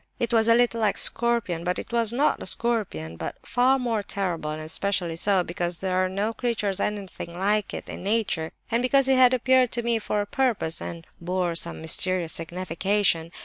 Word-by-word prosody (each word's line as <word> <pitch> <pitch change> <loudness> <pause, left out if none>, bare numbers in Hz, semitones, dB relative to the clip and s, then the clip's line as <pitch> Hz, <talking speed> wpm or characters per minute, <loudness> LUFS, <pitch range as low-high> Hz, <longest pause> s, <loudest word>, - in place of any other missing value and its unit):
It 235 0 -2
was 225 -1 +4
a 230 - +7
little 235 -1 +2
like 210 -2 +2
a - - -8
scorpion, 235 -8 +1
but 180 +5 -3
was 230 -2 +2
not 275 +5 +1
a - - -4
scorpion, 190 - -1
but - - -5
far 255 +2 +3
more 235 -5 -1
horrible, 175 -6 -2
and 155 0 -4
especially 175 +1 -2
so, 190 +2 +2
because 175 0 -3
there 185 0 -2
are 185 - 0
no 205 +4 -1
creatures 215 -5 -1
anything 195 -4 -4
like 205 +2 +1
it - - -6
in - - -7
nature, 195 -5 -1 0.2
and 235 +1 +2
because 265 +1 +3
it 265 - +4
had 255 -1 +7
appeared 255 0 +3
to 240 - -1
me 235 -1 +1
for 210 -1 -2
a 205 - 0
purpose, 225 -9 0
and 165 -1 -7
bore 180 0 -1
some 170 0 -3
mysterious 170 +1 0
signification. 175 0 0
200 Hz, 195 wpm, -25 LUFS, 175-235 Hz, 0.2 s, a